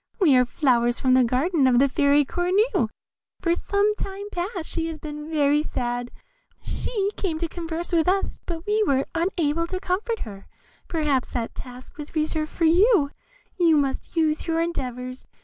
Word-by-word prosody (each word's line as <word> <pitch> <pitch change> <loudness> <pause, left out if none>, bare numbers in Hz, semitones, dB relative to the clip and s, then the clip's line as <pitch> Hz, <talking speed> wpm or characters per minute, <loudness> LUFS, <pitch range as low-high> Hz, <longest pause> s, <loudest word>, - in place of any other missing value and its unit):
We 320 -9 +5
are 250 0 +5
flowers 240 -2 +2
from 260 -1 +3
the 255 0 +6
garden 270 +5 +2
of 250 -1 +4
the 275 +3 +5
Fairy 285 +2 +3
Cornue; 365 - +1 0.5
for 335 - +1
some 405 +4 +1
time 405 0 -6
past 355 -1 -3
she 330 -1 -2
has 325 -1 -5
been 300 0 -7
very 295 -1 +3
sad; 245 -4 -3 0.5
she 405 -4 -2
came 340 -5 -1
to 335 +1 -2
converse 335 +1 -4
with 330 -1 +3
us, 390 +2 0
but 335 -1 -5
we 425 +1 +1
were 275 -9 +2
unable 335 -2 0
to 370 +1 -3
comfort 425 +6 -2
her; 200 -3 -8 0.4
perhaps 300 -6 0
that 235 -2 -4
task 250 +3 -11
was 295 +2 -8
reserved 310 0 0
for 335 - 0
you; 345 -2 +4 0.5
you 330 -3 +5
must 275 +4 -2
use 315 -1 +1
your 330 0 +1
endeavours. 255 -6 -4
315 Hz, 170 wpm, -24 LUFS, 265-355 Hz, 0.5 s, the